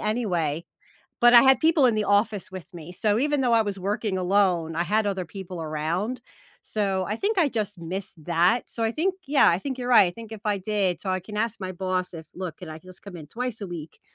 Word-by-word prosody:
anyway, 175 -9 -1 0.6
but 240 0 +7
I 235 - +9
had 265 -2 +5
people 315 -4 +4
in 235 - +3
the 215 -1 0
office 205 -1 +1
with 185 0 -9
me, 170 +1 -9
so 210 +3 +1
even 290 +1 +1
though 245 -2 +2
I 225 - +5
was 200 -2 -4
working 200 0 -2
alone, 180 -4 +1
I 170 - +1
had 210 +4 +1
other 190 -2 -1
people 180 -1 -8
around, 165 +10 -2 0.4
so 195 -3 -1
I 210 - -1
think 405 - -1
I 315 -5 +4
just 210 -5 -3
missed 170 -1 -6
that, 175 +8 +2
so 230 - -5
I 225 - +2
think 365 +7 0
yeah, 285 0 +5
I 170 - +3
think 265 +2 -5
you're 245 0 -4
right; 220 -6 +7
I - - -1
think 225 +3 -11
if 220 - -8
I 205 -2 0
did 195 -2 -1
so 195 - -6
I 185 0 0
can 210 +3 -9
ask 230 0 -1
my 185 0 -4
boss 185 0 -2
if, 160 -1 -9
"Look, 180 -4 -6
can 180 - -9
I 155 - -7
just 185 +2 -15
come 195 -3 -9
in 155 -2 -10
twice 245 +1 -4
a 200 - -4
week 165 -3 -8
200 Hz, 245 wpm, -25 LUFS, 175-225 Hz, 0.6 s, I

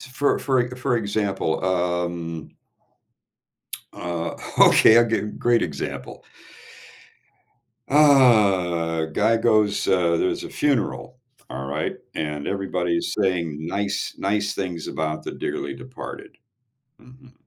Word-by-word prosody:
t 130 - -12
for 140 +2 +1
for 130 -2 +1
e - - -7
for 130 -1 0
example, 100 -6 -1
um 85 -2 -2 1.4
Uh, 85 -1 -4 0.2
okay, 110 - +7
I'll 120 - +6
give 115 -2 -2
great 120 -1 +2
example. 75 -5 -5 1.7
Uh, 100 - +4
guy 110 +8 +2
goes, 110 -3 +2
uh 85 -3 +2
there's 90 - -1
a - - -6
funeral, 125 -2 -1 0.3
all 65 +1 -5
right, 70 - -2 0.2
and 75 -2 -3
everybody's 90 -3 -1
saying 85 -6 -1
nice 100 +4 -2
nice 105 +1 -1
things 90 -4 -4
about 80 0 -3
the - - -5
dearly 70 0 -4
departed. 130 - -10 0.6
Mhm. 130 0 -18
95 Hz, 115 wpm, -23 LUFS, 85-115 Hz, 1.7 s, okay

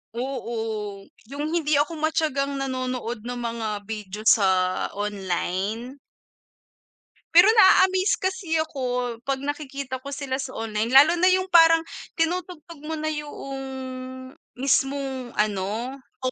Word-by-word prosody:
Oo, 225 -5 -4 0.2
yung 290 +4 -4
hindi 310 -3 +1
ako 300 +2 0
matiyagang 305 -3 0
nanonood 255 -4 -3
ng 245 0 -4
mga 230 -1 -3 0.2
video 210 -1 -6
sa 190 -4 +3
online. 205 +5 -3 1.4
Pero 350 +4 +8
naa-amaze 375 -2 +5
kasi 375 -3 -2
ako 315 -4 -10 0.5
pag 270 -1 0
nakikita 280 -3 -4
ko 280 - -6
sila 275 -2 -3
sa 270 -1 -5
online, 220 0 -2
lalo 285 +5 +8
na 365 - +5
yung 370 0 +2
parang 330 -1 +7 0.3
tinutugtog 335 -1 -3
mo 320 +1 -3
na 310 0 -2
yung 280 -2 -6 0.9
mismong 270 -2 0
ano, 210 +5 -1 0.3
oh 255 - 0
270 Hz, 120 wpm, -24 LUFS, 225-310 Hz, 1.4 s, Pero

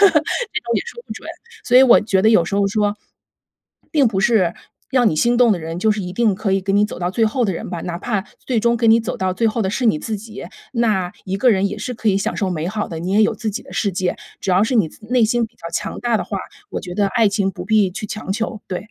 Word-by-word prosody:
这 400 - +8
种 390 +8 -1
也 - - +2
说 475 0 -9
不 - - -6
准。 - - -10 0.4
所 245 - +4
以 255 - +9
我 255 -3 +7
觉 195 -3 +1
得 220 - +5
有 195 -7 +5
时 200 - -3
候 200 0 +2
说， 205 +1 0 0.9
并 285 -5 +3
不 195 -3 -1
是 195 -5 +3 0.4
让 250 -2 +4
你 - - -1
心 240 +8 +3
动 240 -2 +5
的 190 - -1
人， 165 +1 -5
就 220 +4 +2
是 210 - -3
一 180 0 -6
定 220 -1 +2
可 195 +1 -2
以 195 -1 +1
给 195 - -1
你 205 +1 +4
走 - - -8
到 175 0 -1
最 225 +3 +2
后 240 +3 0
的 200 - 0
人 165 - -6
吧， 175 -2 -5
哪 175 -1 -4
怕 210 -2 -2 0.2
最 250 -3 +1
终 235 +2 +2
跟 230 -1 +4
你 225 - +6
走 225 - -4
到 185 -1 -1
最 230 - +1
后 225 +1 -2
的 190 - 0
是 245 +6 -2
你 215 -10 +3
自 220 +5 -3
己， 210 -2 -9 0.3
那 210 -7 0
一 190 +1 -1
个 250 +4 +4
人 200 -2 +2
也 210 - -5
是 250 +4 -4
可 225 -2 -1
以 195 - +3
享 195 - -1
受 195 - 0
美 165 -2 -2
好 210 +1 -3
的， 165 - -6
你 180 +3 -3
也 210 - +4
有 215 - +2
自 225 -3 -3
己 210 - -5
的 - - -14
世 200 -3 0
界。 185 0 -1 0.2
只 - - -2
要 185 +3 +4
是 250 +3 -1
你 205 -8 +3
自 215 - -16
内 245 -2 +3
心 240 +1 +1
比 225 - -11
较 170 - -8
强 210 +1 -3
大 240 -2 +1
的 - - -2
话， - - -4 0.3
我 - - -3
觉 180 -3 -7
得 205 +1 +2
爱 225 +1 +3
情 200 -1 0
不 180 -2 -8
必 210 -3 +3
去 200 +4 -6
强 210 -1 -4
求， 220 0 -3
对。 190 +4 -6
210 Hz, 315 characters per minute, -20 LUFS, 190-230 Hz, 0.9 s, 以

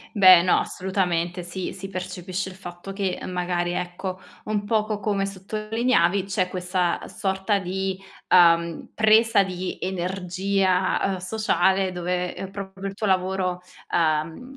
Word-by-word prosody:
Beh 185 -3 +9
no, 180 +1 +3
assolutamente. 180 -2 -1
Sì, 175 +1 -5
si 195 +1 -7
percepisce 185 0 -4
il 185 - -11
fatto 175 0 -9
che, 195 -2 -2
magari 175 -1 -1
ecco, 180 +1 -4 0.3
un 210 -1 -1
poco 215 -1 0
come 200 -2 0
sottolineavi 200 -1 0
c'è 190 -2 -1
questa 180 -1 -1
sorta 190 +1 -1
di, 190 +1 -2 0.3
ehm, 170 -2 +4
presa 220 -1 +5
di 185 -1 -4
energia, 185 +1 0
ehm, - - -3
sociale 190 -1 +1
dove, 180 0 -2
ehm, 195 - -6
proprio 195 0 -6
il 195 - -8
tuo 215 +1 -3
lavoro, 185 -1 0 0.3
ehm, 165 - 0
185 Hz, 130 wpm, -24 LUFS, 180-195 Hz, 0.3 s, Beh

